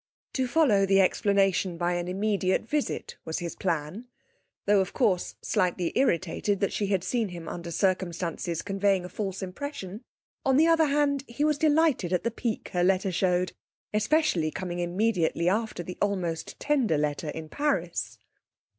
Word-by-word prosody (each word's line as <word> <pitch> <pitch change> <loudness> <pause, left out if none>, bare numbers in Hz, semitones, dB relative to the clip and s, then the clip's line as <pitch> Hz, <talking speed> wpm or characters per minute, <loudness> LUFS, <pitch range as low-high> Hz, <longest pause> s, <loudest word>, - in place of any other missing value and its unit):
To 260 -1 0
follow 240 -9 +3
the 195 0 +4
explanation 195 -2 +2
by 175 +1 0
an 175 0 -2
immediate 190 0 0
visit 295 +1 -2
was 160 - -3
his 170 -1 -4
plan. 175 +6 -3 0.6
Though, 205 -1 +4
of 190 +1 -3
course, 200 -8 +1
slightly 180 -1 0
irritated 200 -4 +1
that 200 - 0
she 205 - -1
had 195 -3 +1
seen 225 +4 0
him 170 -2 -8
under 170 0 -6
circumstances 170 -2 -1
conveying 195 -2 +1
a - - -7
false 195 -1 -4
impression, 200 0 -6 0.4
on 265 -1 +3
the 315 - +6
other 330 -1 +5
hand 280 -1 +1
he 235 +5 -2
was 300 -1 +2
delighted 305 - +3
at 180 - +1
the 235 - 0
pique 230 -1 -3
her 175 -1 0
letter 190 +1 +2
showed, 180 0 +1 0.4
especially 215 - +2
coming 175 +1 -4
immediately 175 -2 +1
after 210 -1 0
the 180 +1 -8
almost 180 -5 -2
tender 260 - +2
letter 150 0 -1
in 160 0 -6
Paris. 170 - -1
190 Hz, 160 wpm, -27 LUFS, 175-230 Hz, 0.6 s, the